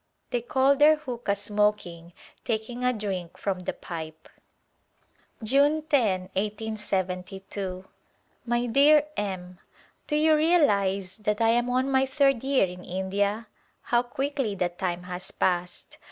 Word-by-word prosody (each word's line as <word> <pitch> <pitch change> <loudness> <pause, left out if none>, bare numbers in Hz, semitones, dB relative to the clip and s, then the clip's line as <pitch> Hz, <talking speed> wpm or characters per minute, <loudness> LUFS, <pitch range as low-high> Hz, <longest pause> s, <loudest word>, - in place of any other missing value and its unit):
They 245 - 0
call 265 +3 +3
their 305 +2 +6
huqqa 245 -8 -3 0.2
%mo\i\n^ 205 -5 0 0.3
taking 235 +1 -3
a 250 - +3
drink 195 -7 -4
from 195 -2 -2
the 180 - -4
pipe. 160 -2 -8 1.2
June 285 +6 +3
10^ 210 - +1
i8y2. 195 -2 -3 0.6
My 240 0 0
dear 285 +5 +5
M: 185 -3 -4 0.5
Do 300 - -1
you 310 +1 +4
realize 200 - +2
that 210 -1 -1
I 225 0 +3
am 240 +1 +2
on 255 +2 +1
my 265 0 +3
third 275 -3 +2
year 270 -5 +3
in 180 0 -9
India? 200 +4 -1 0.4
How 240 0 +2
quickly 265 -2 -2
the 180 -2 0
time 175 0 -3
has 180 0 -6
passed 180 -1 -2
210 Hz, 130 wpm, -26 LUFS, 185-265 Hz, 1.2 s, their